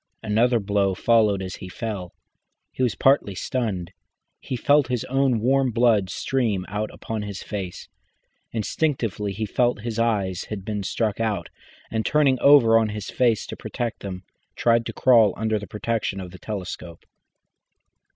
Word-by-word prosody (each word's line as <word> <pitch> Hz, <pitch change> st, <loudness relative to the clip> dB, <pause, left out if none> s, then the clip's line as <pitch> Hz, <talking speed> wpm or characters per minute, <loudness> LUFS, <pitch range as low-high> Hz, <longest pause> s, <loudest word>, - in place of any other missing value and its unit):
Another 115 Hz, +3 st, +2 dB
blow 100 Hz, -2 st, +1 dB
followed 105 Hz, -3 st, +3 dB
as 95 Hz, -1 st, -6 dB
he 95 Hz, -, -9 dB
fell. 100 Hz, -3 st, -5 dB, 0.6 s
He -, -, -6 dB
was 125 Hz, -4 st, +1 dB
partly 135 Hz, -8 st, +3 dB
stunned, 100 Hz, -7 st, -2 dB, 0.5 s
he 130 Hz, -, -5 dB
felt 145 Hz, +2 st, +3 dB
his 125 Hz, -2 st, -1 dB
own 135 Hz, -3 st, +1 dB
warm 130 Hz, +3 st, +2 dB
blood 115 Hz, -5 st, +3 dB
stream 110 Hz, -6 st, -1 dB
out 105 Hz, +2 st, -2 dB
upon 110 Hz, -1 st, -5 dB
his 100 Hz, -2 st, -6 dB
face. 95 Hz, -4 st, -6 dB, 0.6 s
Instinctively 115 Hz, -, -1 dB
he 110 Hz, +3 st, -3 dB
felt 120 Hz, +1 st, +1 dB
his 115 Hz, 0 st, -4 dB
eyes 100 Hz, -6 st, 0 dB
had 100 Hz, -3 st, -6 dB
been 105 Hz, -1 st, -3 dB
struck 105 Hz, +2 st, -1 dB
at, 105 Hz, -6 st, -1 dB, 0.4 s
and, 110 Hz, -1 st, 0 dB
turning 140 Hz, -2 st, +3 dB
over 120 Hz, -6 st, +7 dB
on 110 Hz, -1 st, 0 dB
his 105 Hz, -1 st, -5 dB
face 120 Hz, -4 st, +2 dB
to -, -, -7 dB, 0.2 s
save 120 Hz, -1 st, 0 dB
them, 95 Hz, -2 st, -7 dB, 0.3 s
tried 115 Hz, -1 st, +2 dB
to -, -, -5 dB
crawl 115 Hz, -6 st, +5 dB
under 110 Hz, 0 st, 0 dB
the 105 Hz, -, -8 dB
protection 105 Hz, -2 st, -2 dB
of 90 Hz, -2 st, -7 dB
the 90 Hz, -, -12 dB
telescope. 90 Hz, -5 st, -7 dB
110 Hz, 160 wpm, -24 LUFS, 100-120 Hz, 0.6 s, over